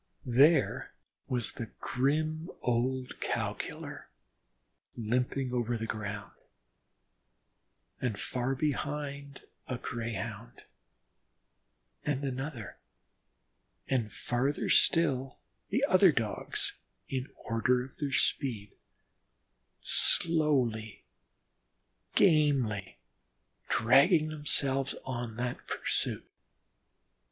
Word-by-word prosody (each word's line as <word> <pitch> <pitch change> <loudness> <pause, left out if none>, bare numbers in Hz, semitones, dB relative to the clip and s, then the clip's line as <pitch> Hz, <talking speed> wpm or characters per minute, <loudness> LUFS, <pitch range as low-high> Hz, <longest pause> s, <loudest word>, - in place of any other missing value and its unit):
There 140 +7 +3 0.3
was 120 -3 -1
the 115 - -6
grim 155 +5 0
old 125 +2 -1
Cow - - -1
killer - - -7 0.9
limping 125 +3 -1
over 120 -1 0
the 115 - -3
ground, 105 -2 -5 1.7
and 115 -5 -1
far 130 +1 -1
behind 140 -1 -3 0.3
a 125 - -3
Greyhound, 115 -1 -5 1.4
and 145 -1 -1
another, 130 - -4 1.1
and 120 -5 0
farther 130 +7 -1
still, 135 -6 +3 0.3
the 260 +7 +2
other 185 - +6
Dogs 110 -7 -2 0.3
in 130 0 -3 0.2
order 125 +2 +2
of 135 - -16
their 145 -2 -2
speed, 115 -7 0 1.1
slowly, 130 - +3 1.1
gamely, 135 - +3 0.7
dragging 145 - +5
themselves 140 -3 +1
on 120 -3 -4
that 120 +1 -4
pursuit. - - -1
130 Hz, 80 wpm, -31 LUFS, 115-145 Hz, 1.7 s, other